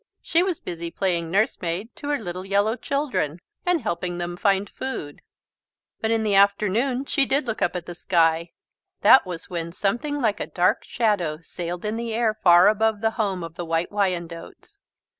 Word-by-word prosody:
She 335 - +2
was 365 -3 -1
busy 170 -1 -5
playing 170 -2 -1
nurse 210 +7 +1
maid 180 +7 -3
to 285 - -7
her 290 - +2
little 185 -5 -6
yellow 200 +3 +1
children 255 - -2 0.3
and 355 -3 +2
helping 175 -3 -3
them 175 0 -4
find 200 +1 +1
food. 200 - -6 0.8
But 220 - -1
in 225 -1 +1
the 210 -2 +1
afternoon 210 +7 +2
she 275 -2 +1
did 275 +1 +1
look 225 -2 -4
up - - +1
at 175 -2 -4
the 175 - -7
sky. 165 -1 +2 0.5
That 260 - +7
was 180 0 -7
when 170 -1 -3
something 240 - -1
like 220 -6 +1
a - - -3
dark 180 -1 +1
shadow 200 -10 0
sailed 175 +3 -5
in 215 +2 -2
the 230 -1 -3
air 225 -2 +2
far 180 -3 +6
above 215 0 +2
the 225 0 +2
home 200 -6 -2
of 165 -1 -7
the 175 - -5
White 165 +1 -1
Wyandottes. 175 -5 -3
200 Hz, 185 wpm, -24 LUFS, 175-225 Hz, 0.8 s, That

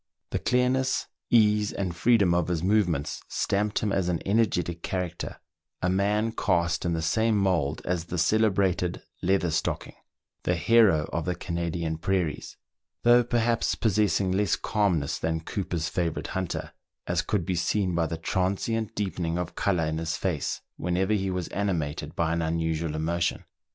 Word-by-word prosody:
The - - 0
clearness, 125 +1 +1 0.2
ease, 105 -2 +4
and 95 -4 -3
freedom 100 -2 +4
of 85 -2 +1
his 85 -2 -1
movements 90 -7 +1
stamped 105 +2 0
him 105 - +1
as 95 -2 +1
an 85 -2 0
energetic 90 -5 +1
character, 90 -2 -4 0.4
a 90 - +1
man 105 +4 +1
cast 85 -5 0
in 85 - +1
the 80 -1 -1
same 110 +7 +2
mould 85 -7 +1
as 85 -2 -1
the 90 +1 -4
celebrated 95 -3 +2
" - - -41
Leather 95 -1 +2
stocking/' 80 - -2 0.5
the 90 - +1
hero 95 -5 +4
of 85 - -1
the 90 - -1
Canadian 85 -2 -3
prairies, 90 -4 -1 0.5
though 120 +1 +6
perhaps 120 -1 +1
possessing 105 -3 +2
less 100 -2 +2
calmness 90 -9 0
than 80 0 -1
Cooper's 85 -2 -3
favourite 85 -3 -2
hunter, 95 -3 -3 0.3
as - - +1
could 100 -6 -1
be 95 - -1
seen 90 +2 0
by 85 -1 +1
the 85 - -4
transient 100 +6 -1
deepening 90 -5 -2
of 90 -1 -3
colour 90 -5 +1
in 80 0 -2
his 80 0 -2
face, 85 -7 -2 0.2
whenever 90 +4 0
he 95 -2 0
was 90 -2 -2
animated 85 -8 -2
by 80 -1 +1
any 85 0 0
unusual 80 -1 -1
emotion. 85 +2 -1
90 Hz, 160 wpm, -27 LUFS, 85-105 Hz, 0.5 s, though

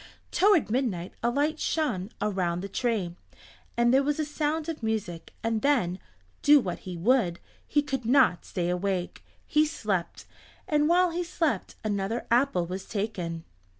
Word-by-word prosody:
Toward 370 - +4
midnight 220 -9 -1
a 235 - +2
light 295 +5 0
shone 225 - -1
around 185 -4 -1
the 200 - -4
tree, 200 -5 -1 0.6
and 240 +1 +4
there 270 - +6
was 290 +1 0
a 310 - +1
sound 305 +1 -2
of 325 -5 -4
music, 210 -7 -3
and 225 -1 0
then, 215 -11 +1 0.4
do 295 0 +7
what 185 -9 -3
he 180 -2 -7
would, 185 -3 +2 0.3
he 295 0 +2
could 270 -4 -3
not 245 -6 +4
stay 175 -1 -2
awake. 180 0 -2 0.2
He 300 - +3
slept, 210 - -2 0.4
and 300 0 +2
while 360 0 +4
he 350 +2 -1
slept 325 - -1
another 210 +2 -2
apple 240 -8 +3
was 185 +2 -6
taken. 180 -6 -3
230 Hz, 155 wpm, -27 LUFS, 185-295 Hz, 0.6 s, do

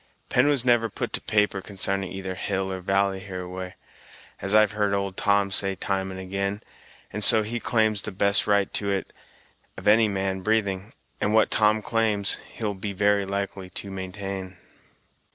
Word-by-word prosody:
Pen 125 +3 +3
was 140 -4 +1
never 120 -2 +3
put - - -5
to - - 0
paper 105 -2 +1
consarning 95 -1 -2
either 95 -1 -5
hill 95 0 -2
or 95 - -5
valley 95 +1 +1
hereaway, 90 -1 -6 0.7
as 100 +2 +2
I've 110 -1 +5
heard 105 -1 0
old 100 -1 -2
Tom 100 -1 +2
say 95 -1 0
time 95 0 -2
and 95 0 -7
ag'in, 100 +2 -3 0.5
and 105 - -2
so 110 +1 +7
he 120 +3 -3
claims 110 -3 +1
the 110 - -5
best 100 +1 +3
right 100 -2 +2
to 100 - -1
it 100 -1 -2 0.7
of 95 - -6
any 110 +1 +6
man 95 -1 -2
breathing; 100 -1 0 0.3
and 105 +1 +1
what 110 - +4
Tom 110 0 +3
claims, 110 -3 +1
he'll 105 -3 -3
be 100 +1 -5
very 100 0 +2
likely 100 -1 -4
to 100 +1 -5
maintain." 95 0 -6
100 Hz, 170 wpm, -25 LUFS, 95-105 Hz, 0.7 s, so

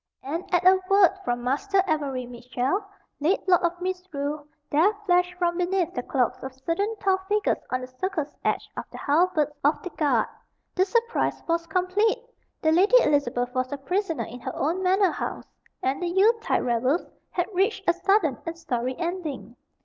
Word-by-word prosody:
And 325 +7 -4
at 355 0 +2
a 375 0 +6
word 390 -2 +6
from 240 0 -2
Master 380 +10 +1
Avery 280 -6 -1
Mitchell, 250 - -2 0.4
late 340 +7 +1
Lord 360 -2 +5
of 345 0 -1
Misrule, 310 -6 -4 0.2
there 325 +8 +4
flashed 360 -1 +2
from 345 -1 0
beneath 360 -1 0
the 245 - -2
cloaks 250 -1 0
of 265 -1 -7
certain 335 +11 -1
tall 385 -2 +2
figures 420 0 +1
on 255 0 -1
the 255 - -6
circle's 305 +3 -3
edge - - 0 0.2
the - - -9
halberds 310 0 +2
of 290 +3 +3
the 365 - -5
guard. 280 -8 +1 0.5
The 370 - +3
surprise 470 +3 0
was 335 0 0
complete. 400 +8 +1 0.4
The 315 - +4
Lady 385 +9 +5
Elizabeth 245 -4 +1
was 255 -1 -1
a 285 - -3
prisoner 355 +3 -1
in 245 - -9
her 245 - -6
own 335 +6 0
manor 375 0 +3
house, - - -4 0.4
and 265 +4 0
the 355 - -1
Yule 385 +6 +4
tide - - 0
revels 255 +7 +1 0.2
had 355 - -1
reached 390 +2 0
a 345 - +5
sudden 355 - +2
and 330 0 -5
sorry 255 -6 -2
ending. 320 - -4
335 Hz, 175 wpm, -25 LUFS, 275-375 Hz, 0.5 s, a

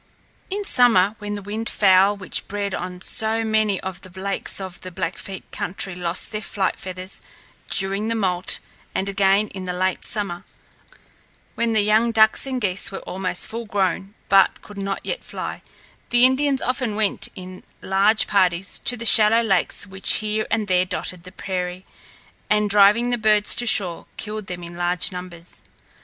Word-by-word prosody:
In 405 +1 -3
summer, 215 - +6
when 205 0 -5
the 205 - -7
wildfowl 205 -2 +2
which 185 - -3
bred 200 -1 -3
on 180 0 -5
so 220 +3 +2
many 215 -3 +1
of 190 0 -6
the 185 - -12
lakes 195 +1 +1
in 190 - -4
the 185 - -8
Blackfeet 185 +2 -6
country 190 +1 -4
lost 175 0 -1
their 210 -1 -4
flight 195 -3 -2
feathers, 185 0 -7 0.5
during 195 +2 -2
the 230 - -1
moult, 185 -4 +1 0.4
and 190 - -1
again 200 +1 +2
in 190 -1 -8
the 180 - -3
late 185 0 -1
summer, 195 -6 0 1.1
when 230 -1 -1
the 215 -2 +3
young 220 +3 +3
ducks 220 +3 +3
and 260 -1 -2
geese 200 -4 0
were 195 - -6
almost 185 -1 -1
fullgrown 200 -3 -3
but 195 -1 +3
could 205 -1 -10
not 195 0 -4
yet - - -4
fly, - - -6 0.5
the 240 +1 +5
Indians 270 +1 +2
often 250 -3 -2
went 215 -2 -1
in 185 -1 -10 0.2
large 200 +3 +2
parties 185 -2 0
to 245 - +1
the 230 - -6
shallow 225 +1 +6
lakes 195 -2 +1
which 190 -1 0
here 215 0 -2
and 220 -2 -1
there 180 -1 +3
dotted 180 -1 -5
the 180 - -11
prairie, 185 -1 -5 0.6
and, 210 -1 +2
driving 210 +4 +4
the 245 - 0
birds 215 -1 +3
to 240 - -1
shore, 185 -6 +1
killed 215 -2 -6
them 175 -1 -6
in 170 0 -9
large 175 +1 -1
numbers. 180 -2 -8
200 Hz, 170 wpm, -22 LUFS, 185-220 Hz, 1.1 s, summer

